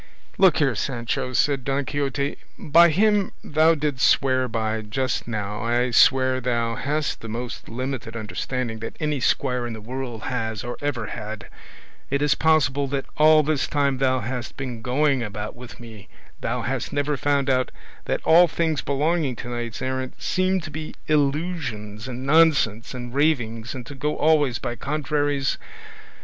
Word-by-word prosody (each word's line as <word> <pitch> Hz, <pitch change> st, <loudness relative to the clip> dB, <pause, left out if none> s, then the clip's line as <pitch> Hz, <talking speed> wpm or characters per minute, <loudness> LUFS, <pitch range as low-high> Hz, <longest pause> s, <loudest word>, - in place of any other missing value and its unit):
"Look 190 Hz, -4 st, +6 dB
here, 140 Hz, -4 st, +2 dB
Sancho," 120 Hz, +2 st, -2 dB
said 135 Hz, 0 st, +2 dB
Don 135 Hz, +1 st, -1 dB
Quixote, 140 Hz, 0 st, -2 dB, 0.2 s
"by 170 Hz, +3 st, +5 dB
him 205 Hz, +3 st, +2 dB
thou 155 Hz, +2 st, +4 dB
didst 145 Hz, -3 st, +1 dB
swear 130 Hz, -1 st, +2 dB
by 110 Hz, -1 st, -2 dB
just 125 Hz, +5 st, -2 dB
now 105 Hz, -1 st, -3 dB
I 120 Hz, +2 st, +1 dB
swear 130 Hz, 0 st, +4 dB
thou 120 Hz, -2 st, 0 dB
hast 145 Hz, +5 st, -2 dB
the 115 Hz, -, -7 dB
most 120 Hz, +2 st, -6 dB
limited 125 Hz, -1 st, -4 dB
understanding 115 Hz, +1 st, -3 dB
that 115 Hz, -, -7 dB
any 150 Hz, -2 st, -1 dB
squire 125 Hz, -1 st, 0 dB
in 120 Hz, -, -5 dB
the 110 Hz, -, -7 dB
world 120 Hz, 0 st, -6 dB
has 110 Hz, -4 st, -3 dB
or 120 Hz, 0 st, -4 dB
ever 135 Hz, -6 st, -2 dB
had. 105 Hz, 0 st, -7 dB, 0.6 s
Is 140 Hz, +1 st, +2 dB
it -, -, -10 dB
possible 145 Hz, -3 st, +3 dB
that 135 Hz, 0 st, -2 dB
all 155 Hz, 0 st, +6 dB
this 150 Hz, -1 st, 0 dB
time 140 Hz, -3 st, 0 dB
thou 130 Hz, -1 st, +2 dB
hast 125 Hz, 0 st, -5 dB
been 125 Hz, -4 st, -5 dB
going 135 Hz, +2 st, +1 dB
about 105 Hz, -1 st, -5 dB
with 125 Hz, 0 st, -11 dB
me 110 Hz, -4 st, -12 dB, 0.3 s
thou 125 Hz, -2 st, -2 dB
hast 130 Hz, +2 st, -2 dB
never 145 Hz, +1 st, 0 dB
found 140 Hz, 0 st, +1 dB
out 130 Hz, -1 st, +2 dB, 0.4 s
that -, -, -1 dB
all 175 Hz, +2 st, +7 dB
things 160 Hz, -2 st, 0 dB
belonging 145 Hz, 0 st, 0 dB
to 120 Hz, -, -7 dB
knights 120 Hz, 0 st, -4 dB
errant 130 Hz, 0 st, -3 dB
seem 185 Hz, 0 st, +1 dB
to 155 Hz, -, -8 dB
be 155 Hz, +1 st, -6 dB
illusions 140 Hz, -, -1 dB
and 130 Hz, 0 st, -6 dB
nonsense 140 Hz, -7 st, +3 dB
and 120 Hz, -1 st, -7 dB
ravings, 120 Hz, -6 st, 0 dB
and 125 Hz, -2 st, -7 dB
to 145 Hz, -, -9 dB
go 150 Hz, +3 st, -2 dB
always 150 Hz, -6 st, +3 dB
by 120 Hz, -, -4 dB
contraries? 145 Hz, 0 st, -1 dB
130 Hz, 165 wpm, -24 LUFS, 120-145 Hz, 0.6 s, all